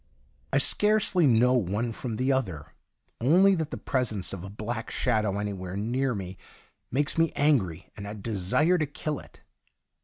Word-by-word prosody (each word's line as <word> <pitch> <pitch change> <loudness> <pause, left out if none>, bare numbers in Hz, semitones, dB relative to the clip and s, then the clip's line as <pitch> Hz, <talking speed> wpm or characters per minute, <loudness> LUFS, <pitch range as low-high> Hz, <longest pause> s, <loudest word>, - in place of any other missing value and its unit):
I - - +2
scarcely 210 -6 +3
know 125 +1 +4
one 115 0 0
from 115 0 -5
the 130 +4 +1
other, 90 - -2 0.5
only 180 +11 +5
that 160 -5 -1
the - - -5
presence 110 -9 -1
of 95 -3 -6
a 95 - -7
black 110 +3 -5
shadow 110 -5 0
anj'where 100 -2 -4
near 125 +4 -1
me 95 -1 -7 0.5
makes 145 +5 0
me 165 -1 +3
angry, 100 - +1
and 100 -1 -7
I 105 - -6
desire 110 - +1
to 155 - 0
kill 150 0 -4
it. - - -17
115 Hz, 160 wpm, -27 LUFS, 100-145 Hz, 0.5 s, only